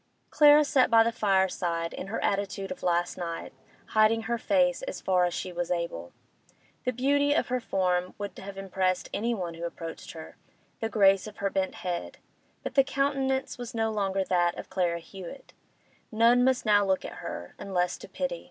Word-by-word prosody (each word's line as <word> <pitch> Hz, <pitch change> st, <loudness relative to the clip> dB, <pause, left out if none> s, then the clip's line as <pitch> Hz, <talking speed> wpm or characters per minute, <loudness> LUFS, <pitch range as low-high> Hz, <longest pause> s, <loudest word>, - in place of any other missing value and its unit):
Clara 295 Hz, 0 st, +7 dB
sat 275 Hz, -3 st, +3 dB
by 225 Hz, 0 st, +6 dB
the 230 Hz, -, +1 dB
fireside, 190 Hz, -5 st, 0 dB
in -, -, -6 dB
her 220 Hz, -, -3 dB
attitude 195 Hz, -1 st, -1 dB
of 275 Hz, -, -6 dB
last 175 Hz, 0 st, 0 dB
night, 170 Hz, -1 st, -5 dB, 0.4 s
hiding 220 Hz, +1 st, +3 dB
her 235 Hz, +1 st, -2 dB
face 270 Hz, -1 st, +2 dB
as -, -, -5 dB
far 180 Hz, -1 st, +2 dB
as 175 Hz, -, -1 dB
she 185 Hz, -, -4 dB
was 175 Hz, 0 st, -3 dB
able. 170 Hz, -, -3 dB, 0.7 s
The 255 Hz, -, +2 dB
beauty 285 Hz, +3 st, +2 dB
of -, -, 0 dB
her 255 Hz, 0 st, 0 dB
form 180 Hz, -5 st, 0 dB
would 205 Hz, -1 st, -5 dB
have 195 Hz, 0 st, -8 dB
impressed 190 Hz, -1 st, -1 dB
anyone 205 Hz, -6 st, -2 dB
who 165 Hz, +1 st, -8 dB
approached 165 Hz, -1 st, -6 dB
her, 160 Hz, -1 st, -10 dB, 0.4 s
the 225 Hz, -, -2 dB
grace 195 Hz, -2 st, +4 dB
of 210 Hz, -, -11 dB
her 200 Hz, -1 st, -1 dB
bent 190 Hz, -1 st, -1 dB
head; 175 Hz, -1 st, -3 dB, 0.5 s
but -, -, -4 dB
the 275 Hz, -, +5 dB
countenance 270 Hz, -2 st, -1 dB
was 245 Hz, -1 st, -6 dB
no 225 Hz, -1 st, +1 dB
longer 195 Hz, -2 st, 0 dB
that 175 Hz, -2 st, +1 dB
of -, -, -8 dB
Clara 180 Hz, -3 st, 0 dB
Hewett; 190 Hz, +8 st, -10 dB, 0.6 s
none 235 Hz, +2 st, +5 dB
must 260 Hz, -1 st, +2 dB
now 205 Hz, -1 st, +5 dB
look 190 Hz, -1 st, 0 dB
at -, -, -7 dB
her, 85 Hz, 0 st, -6 dB
unless 180 Hz, -2 st, -1 dB
to -, -, -11 dB
pity. -, -, -3 dB
200 Hz, 185 wpm, -28 LUFS, 180-245 Hz, 0.7 s, Clara